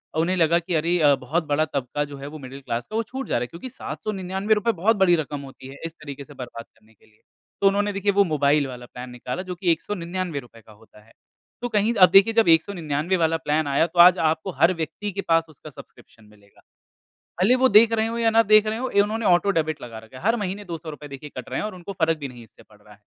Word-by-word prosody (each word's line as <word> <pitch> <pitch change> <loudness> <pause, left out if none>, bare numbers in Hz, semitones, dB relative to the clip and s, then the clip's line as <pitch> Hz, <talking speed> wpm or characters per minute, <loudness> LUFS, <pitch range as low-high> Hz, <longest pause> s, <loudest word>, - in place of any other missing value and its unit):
अ, - - -3
उन्हें 175 +3 +1
लगा 170 0 +3
कि 175 +1 -5
अरे 165 +3 +1
अ, 145 -3 +5
बहुत 165 +5 -2
बड़ा 150 +2 +1
तबका 140 0 -3
जो 140 - -8
है 135 +1 -8
वो 155 +2 -8
मिडल 135 0 -9
क्लास 120 -2 -4
का 215 - -6
वो 225 - +1
छूट 265 +4 -7
जा - - -1
रहा - - -2
है 125 - -2
क्योंकि 170 - -9
799 195 -3 -3
रुपए 215 +2 +1
बहुत 225 +3 +4
बड़ी 190 -3 +4
रकम 145 -3 -4
होती 135 -1 -12
है 135 +1 -11
इस 165 - -6
तरीके 145 -3 -9
से - - -15
बर्बाद 120 -2 -8
करने 110 0 -28
के 105 - -28
लिए। 110 0 -29 0.4
तो 200 - +5
उन्होंने 205 +1 +1
देखिए 200 +1 0
वो 200 0 +4
मोबाइल 145 -4 +1
वाला 125 -1 -9
प्लान 125 +1 -9
निकाला 125 +4 -5
जो 180 -1 -6
कि 175 0 +1
199 175 -2 -3
रुपए 120 -3 -15
का 110 - -19
होता 105 0 -19
है। 115 - -23 0.5
तो 245 - -3
कहीं 215 +1 +1
अब 185 -4 +7
देखिए 195 +4 +6
जब 225 -3 +3
199 165 0 +1
वाला 165 -1 +1
प्लान 155 -1 -1
आया 140 +3 +2
तो 175 - -5
आज 180 +1 +8
आपको 160 +3 0
हर 175 +2 +5
व्यक्ति 165 +5 -5
के 200 +1 -4
पास 165 0 +3
उसका 155 0 -13
सब्सक्रिप्शन 115 -5 -16
मिलेगा। 105 -1 -23 0.8
भले 205 +7 +5
वो 260 - +5
देख 225 +1 +6
रहे 220 0 +1
हो 230 +1 -3
या 230 -1 +2
ना 225 +1 +5
देख 215 0 +5
रहे 215 +1 -2
हो 260 +2 -2
ए, 200 - +3
उन्होंने 215 +2 -1
ऑटो 180 +2 +4
डेबिट 155 -4 -1
लगा 115 -2 -8
रखा 110 +3 -13
है। - - -14
हर 225 +3 +3
महीने 205 -1 -4
200 165 -3 -7
रुपए 150 -1 -10
देखिए 140 +2 -9
कट 130 - -7
रहे - - -3
हैं - - -2
और 215 - -7
उनको 180 +2 -8
फ़र्क 165 -3 0
भी 140 -2 -5
नहीं 120 -2 -12
इससे 110 - -20
पड़ - - -23
रहा - - -17
है। - - -25
165 Hz, 265 wpm, -23 LUFS, 140-200 Hz, 0.8 s, आज